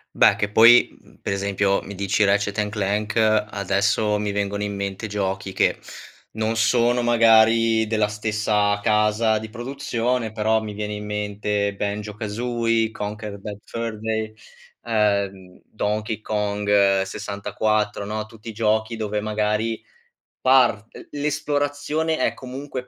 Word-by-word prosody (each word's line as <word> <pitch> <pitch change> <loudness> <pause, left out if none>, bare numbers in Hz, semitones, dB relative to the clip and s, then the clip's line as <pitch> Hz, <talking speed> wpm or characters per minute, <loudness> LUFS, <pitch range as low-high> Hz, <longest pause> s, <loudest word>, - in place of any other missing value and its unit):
Beh, - - +5
che 100 - -1
poi, 115 +3 +6
mhmm, - - -22
per - - -2
esempio 100 0 0
mi 100 - -8
dici 100 +2 0
Ratchet& 105 +1 +1
Clank 105 0 -2
adesso 105 -1 +1
mi 105 0 -2
vengono 100 0 -2
in 105 0 -3
mente 100 +1 -4
giochi 95 -2 -3
che - - +1 0.5
non 110 +1 -2
sono 120 +2 +2
magari 115 -1 +4
della 110 -1 +1
stessa 105 -1 0
casa 105 +1 +2
di 110 0 -6
produzione, 120 -1 -2
però 110 0 +1
mi 105 -1 -6
viene 105 0 -4
in 105 0 -6
mente 105 -1 -2
Banjo-Kazooie, 110 +3 -1
Conker's 105 -1 -6
Bad 100 0 -7
Fur 115 -2 -5
Day, 110 0 -2 0.5
ehm, 100 -4 -1
Donkey 105 +1 -3
Kong 100 -2 +1
64, 105 +2 -2
no, 105 +1 -4
tutti 115 0 -11
i - - -4
giochi 110 +1 0
dove 105 -1 -2
magari 110 +1 -1 0.6
part 125 -4 +4
l - - -12
l'esplorazione 150 +1 -1
è - - +1
comunque 130 0 -7
105 Hz, 130 wpm, -23 LUFS, 105-115 Hz, 0.6 s, poi